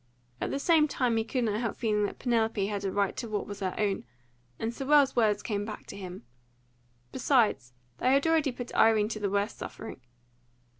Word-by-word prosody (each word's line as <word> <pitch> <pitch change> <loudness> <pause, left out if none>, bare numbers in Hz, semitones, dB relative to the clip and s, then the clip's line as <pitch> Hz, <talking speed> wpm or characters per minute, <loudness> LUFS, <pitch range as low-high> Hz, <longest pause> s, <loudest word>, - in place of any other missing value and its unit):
At - - -1
the - - -1
same 310 +1 +4
time 250 -5 0
he 225 - +2
could 245 +2 -1
not 215 -2 0
help 230 -3 -2
feeling 210 -2 +1
that - - -9
Penelope 225 -4 +1
had 200 -1 -3
a 195 - -1
right 200 0 0
to 235 - -4
what 210 -1 -2
was 205 -1 -7
her 185 -2 -2
own, 205 -7 0 0.5
and 225 +1 -3
Sewell's 280 +1 +3
words 210 -3 +2
came 205 -2 -2
back 215 0 -7
to - - -9
him. 185 -2 -8 0.9
Besides, 225 - +2 0.3
they 255 - +3
had 275 +2 +3
already 320 -4 +3
put 245 0 -7
Irene 215 -1 +4
to 220 - -4
the 205 -1 -1
worst 200 +2 -1
suffering. - - -8
220 Hz, 200 wpm, -29 LUFS, 205-250 Hz, 0.9 s, same